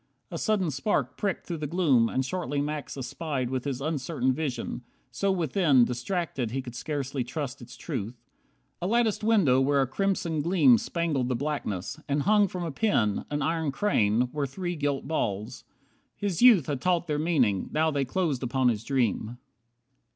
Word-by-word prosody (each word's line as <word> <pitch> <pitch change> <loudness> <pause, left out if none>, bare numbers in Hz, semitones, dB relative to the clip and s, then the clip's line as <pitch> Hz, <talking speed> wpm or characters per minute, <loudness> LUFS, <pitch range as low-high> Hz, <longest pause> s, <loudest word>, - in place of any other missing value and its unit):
A - - -4
sudden 200 -7 +1
spark 140 +10 -1
Pricked 200 -2 -2
through 170 -3 -4
the 150 - -3
gloom, 140 -9 +3
and 130 - -1
shortly 165 -3 -2
Max 145 0 -3
espied 135 -1 -3
With 130 0 -2
his 135 -2 -3
uncertain 140 -3 0
vision, 130 -5 -3 0.3
so 195 +11 0
within 160 -7 +3
Distracted 125 - -2
he 130 +4 -3
could 120 -2 -8
scarcely 135 0 -3
trust 140 +1 -5
its 120 0 -11
truth, 110 +2 -4 0.7
A 175 - -1
latticed 225 -1 +1
window 190 - +4
where 140 +1 +2
a 135 - +3
crimson 165 +2 -1
gleam 145 - +5
Spangled 150 - -1
the 125 - 0
blackness, 140 - -3
and 140 0 +1
hung 210 0 +4
from 180 -1 -5
a 165 - -3
pin, 135 - +1
An 145 -1 -1
iron 160 -1 0
crane, 125 - +2
were 145 -2 -2
three 175 +5 -4
gilt 145 -3 -2
balls. 105 -9 -3 0.5
His 200 -3 -2
youth 230 - +7
Had 140 -4 -3
taught 175 +1 +1
their 150 -3 -1
meaning, 130 - +1
now 160 +1 +2
they 140 -2 0
closed 145 -1 -1
upon 130 0 +2
his 110 -2 -2
dream. 120 -3 -1
145 Hz, 175 wpm, -27 LUFS, 125-170 Hz, 0.7 s, youth